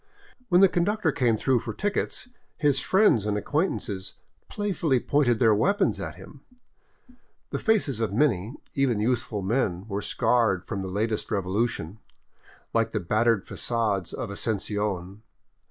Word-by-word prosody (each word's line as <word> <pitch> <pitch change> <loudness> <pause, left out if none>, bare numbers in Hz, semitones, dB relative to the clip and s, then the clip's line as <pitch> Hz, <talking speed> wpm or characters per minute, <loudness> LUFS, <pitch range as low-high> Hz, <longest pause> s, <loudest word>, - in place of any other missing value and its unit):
When 180 0 +5
the 195 - +9
con 175 -1 0
ductor 205 -4 +1
came 120 -5 +1
through 130 +2 +2
for - - -6
tickets, 205 +4 -2 0.3
his 145 -3 +2
friends 140 - +3
and 105 0 0
acquaintances 105 - -2 0.3
play 205 -1 -2
fully 155 -8 +1
pointed 130 -3 +2
their 110 -2 +4
weapons 200 - +1
at - - -5
him. - - -13 1.1
The - - -2
faces 195 - +1
of 115 -3 -1
many, 115 -1 +1 0.2
even 130 -6 +1
youth 120 +2 +1
ful, 105 -5 -5
men 100 -3 -1
were 100 -1 -3
scarred 110 -8 +1
from 100 -3 -4
the 95 - -4
latest 105 +3 -2
revolution, 100 -1 -2 0.7
like 115 -1 +1
the 105 - 0
battered 110 +3 +1
fagades 105 -7 -1
of 105 - -5
Asuncion. 105 -2 -3
115 Hz, 150 wpm, -26 LUFS, 100-140 Hz, 1.1 s, the